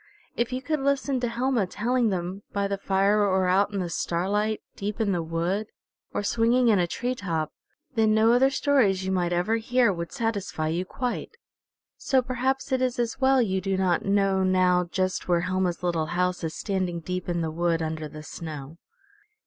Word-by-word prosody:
If 235 +1 -1
you 255 +1 -3
could 310 0 -1
listen 275 -1 0
to 245 - -1
Helma 235 -3 0
telling 235 +4 +1
them, 185 +1 -3
by 200 -1 0
the 200 0 -3
fire, 195 +2 +2
or 190 -2 +2
out 195 +3 +3
in 200 - -3
the 180 - -1
starlight, 200 +6 -1
deep 205 +2 -4
in 215 -3 +1
the 175 -3 0
wood, 170 +6 -1 0.4
or - - -2
swinging 235 +3 +3
in 210 -4 +4
a 175 - +2
tree 245 +8 -2
top, 165 -9 -3 0.4
then 220 -2 +3
no 220 +1 +4
other 260 +2 +5
stories 245 -10 +2
you 190 - -1
might 175 -2 0
ever 180 +6 +1
hear 235 -1 +2
would 170 -1 -5
satisfy 200 -8 -2
you 175 +3 -1
quite. 250 - -4 0.6
So 260 -2 +2
perhaps 260 +2 -1
it 260 -1 +1
is 255 0 0
as 235 +2 -2
well 265 -1 +5
you 190 -3 -1
do 195 0 -1
not 185 -2 +1
know 195 -1 +2
now 185 -1 +3
just 185 +1 -2
where 175 -1 +3
Helma's 185 -1 -1
little 165 -3 0
house 180 +1 -1
is 160 -1 -3
standing 185 -4 -2
deep 180 +2 -4
in 170 -1 0
the 160 -1 -2
wood 165 0 0
under 155 -1 -3
the 150 +1 -10
snow. 155 -1 -8
195 Hz, 195 wpm, -26 LUFS, 175-235 Hz, 0.6 s, other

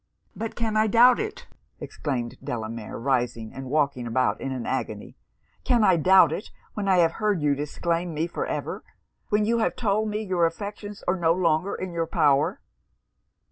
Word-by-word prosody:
'But 225 0 -5
can 225 -2 -2
I 215 0 +3
doubt 240 +4 +6
it!' 440 +3 -5 0.3
exclaimed 125 -5 -4
Delamere, 115 -1 -5
rising, 120 -3 -1
and 135 -1 -7
walking 140 -4 0
about 130 +2 0
in 135 - -3
an 125 -3 -4
agony - - -4 0.5
'Can 240 -4 +3
I 190 -3 +5
doubt 180 -1 +6
it, 195 - -5 0.2
when 205 -2 -3
I 190 -1 +4
have 165 -2 +4
heard 210 -4 +2
you 145 -1 +3
disclaim 165 +4 -2
me 155 +1 -1
for 170 - -4
ever! - - -4 0.5
when 210 0 +2
you 230 +2 +1
have 220 - 0
told 215 -1 0
me 210 +1 -2
your 180 -4 +2
affections 205 +3 -7
are 180 +2 +2
no 165 -2 +3
longer 170 +1 +1
in 185 -2 -5
your 165 -1 -1
power!' 145 -2 +2
170 Hz, 180 wpm, -25 LUFS, 140-210 Hz, 0.5 s, doubt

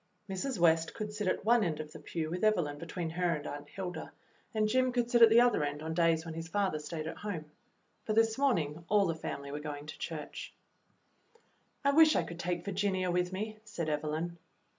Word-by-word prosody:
Mrs. 200 +6 -3
West 165 -1 +3
could 210 -1 -4
sit 210 -2 -2
at 185 - 0
one 235 0 +5
end 160 -4 -1
of 155 0 -6
the - - -10
pew 160 -2 -4
w^ith 180 - -3
Evelyn 175 -10 +2
between 165 0 -4
her 175 0 +1
and 150 0 -6
Aunt 145 0 -6
Hilda, 180 0 -5 0.4
and 215 -2 +1
Jim 255 +3 +2
could 240 -1 0
sit 240 - +4
at 230 - +10
the 230 +2 +7
other 245 -10 +3
end 145 +1 -3
on 160 0 -3
days 165 -1 +2
when 165 - -5
his 165 +1 -5
father 190 -3 0
stayed 155 +1 -5
at 160 - -5
home, 180 -7 -4 0.6
but 215 - +1
this 225 0 +4
morning 170 - +1
all 205 0 +5
the 165 - +1
family 140 -3 -5
were 145 - -4
going 145 -1 -6
to 150 - -9
church. 155 -3 -6 1.3
"I 280 - +5
wish 310 +1 +7
I - - +3
could 170 0 -8
take 175 0 -2
Virginia 190 -2 0
with 180 +1 +1
me," 215 +3 -4
said 175 -8 -4
Evelyn. 155 +3 -2
175 Hz, 215 wpm, -32 LUFS, 160-215 Hz, 1.3 s, at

